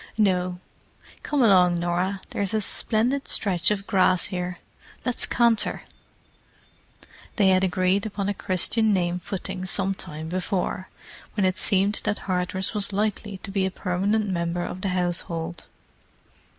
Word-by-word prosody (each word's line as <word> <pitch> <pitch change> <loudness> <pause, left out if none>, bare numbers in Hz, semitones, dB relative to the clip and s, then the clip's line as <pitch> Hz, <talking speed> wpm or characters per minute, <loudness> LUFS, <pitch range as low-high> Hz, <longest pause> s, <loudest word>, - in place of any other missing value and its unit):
"No. 180 -4 +1 0.6
Come 290 -3 +1
along, 180 -5 +5
Norah, 180 +3 -1
there's 200 +1 -2
a 215 - +1
splendid 240 +7 0
stretch 180 -5 +2
of 200 -1 -1
grass 185 -2 +3
here: 180 0 -3 0.5
let's 250 -2 +2
canter!" 235 -2 +2 1.5
They 200 -3 +4
had 185 0 +4
agreed 185 +2 +1
upon 200 -2 -3
a 205 - 0
Christian 210 +4 +2
name 180 -1 0
footing 190 0 -5
some 195 0 +1
time 155 -4 -5
before, 185 +1 -2 0.5
when 205 -3 +2
it 185 +1 0
seemed 200 +2 +2
that 205 - 0
Hardress 185 +1 -1
was 205 -1 0
likely 210 0 -2
to 195 - -5
be 195 -1 0
a 190 - +1
permanent 200 +4 0
member 175 -1 -1
of 185 - -6
the 195 - -1
household. 175 -2 -2
190 Hz, 140 wpm, -25 LUFS, 180-205 Hz, 1.5 s, along